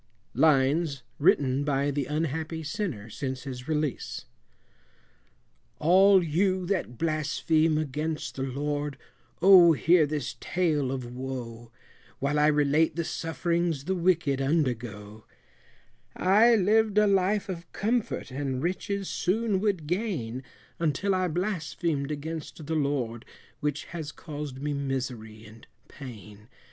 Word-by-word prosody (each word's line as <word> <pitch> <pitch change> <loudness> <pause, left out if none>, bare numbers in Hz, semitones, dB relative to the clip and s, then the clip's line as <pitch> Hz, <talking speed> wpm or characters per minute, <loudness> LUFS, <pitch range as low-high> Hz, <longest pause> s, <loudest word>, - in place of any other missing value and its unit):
Lines 145 -1 +2 0.2
written 145 -5 +3
by 140 0 0
the 140 -2 -2
unhappy 160 +2 -2
Sinner 145 - -4
since 130 +3 -5
his 125 -2 -7
release. 150 -4 -2 1.5
All 185 +5 +5
you 185 +3 +1
that 175 -11 -2
blaspheme 155 0 +1
against 155 +1 -3
the 135 - -6
Lord, 145 +2 -2 0.5
O 180 -3 +8
hear 165 0 +4
this 145 -6 -4
tale 155 -7 0
of 130 -2 -4
woe, 120 -2 -7 0.5
While 140 +4 0
I 150 - +5
relate 150 +1 +3
the 170 - -1
sufferings 165 -2 -1
the 190 - 0
wicked 170 -6 +1
undergo; 115 -8 -2 0.9
I 215 +6 +5
live'd 215 +1 +3
a 210 - +6
life 200 +1 +2
of 175 -3 -7
comfort, 220 - -1
and 130 -1 -3
riches 190 +2 -2
soon 210 +1 0
would 195 -6 0
gain, 155 - -2 0.4
Until 170 +5 0
I 185 -1 +1
blasphemed 170 -4 -2
against 155 +1 -6
the 160 - -3
Lord, 140 -6 -1 0.4
which 150 0 -2
has 160 -3 -6
caused 145 -4 -7
me 150 0 -1
misery 125 -6 -4
and 110 +2 -15 0.2
pain. 110 -4 -11
150 Hz, 120 wpm, -27 LUFS, 135-175 Hz, 1.5 s, O